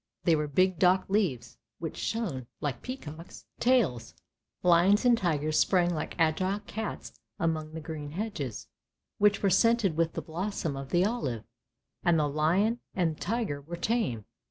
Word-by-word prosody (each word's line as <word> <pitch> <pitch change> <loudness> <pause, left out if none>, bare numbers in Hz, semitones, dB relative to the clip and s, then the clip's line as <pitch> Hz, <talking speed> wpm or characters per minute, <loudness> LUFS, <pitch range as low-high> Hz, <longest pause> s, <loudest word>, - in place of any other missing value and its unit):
They 165 - +4
were 150 -1 -1
big 185 +4 +2
dock 185 +1 +4
leaves, 165 - -1 0.2
which 165 -1 -5
shone 175 - -3
like 140 -5 -3
peacock's 170 - -8
tails. 195 - +2 0.5
Lions 180 +6 +5
and 245 -1 +6
tigers 155 -6 0
sprang 175 -2 +3
like 155 - -4
agile 185 +5 +1
cats 215 +1 -6 0.2
among 155 -2 -1
the 160 - -5
green 150 -2 -6
hedges, 170 - -4 0.5
which 205 0 +3
were 195 - +3
scented 220 -2 +3
with 165 0 +1
the - - -4
blossom 170 -2 -3
of 135 0 -6
the 175 +4 +3
olive, 140 - -2 0.6
and 170 -1 +3
the 150 -1 +2
lion 175 +11 +2 0.2
and 170 -4 +1
the - - -23
tiger 205 -8 -2
were 170 +4 -7
tame. 175 - -1
170 Hz, 155 wpm, -29 LUFS, 150-205 Hz, 0.6 s, and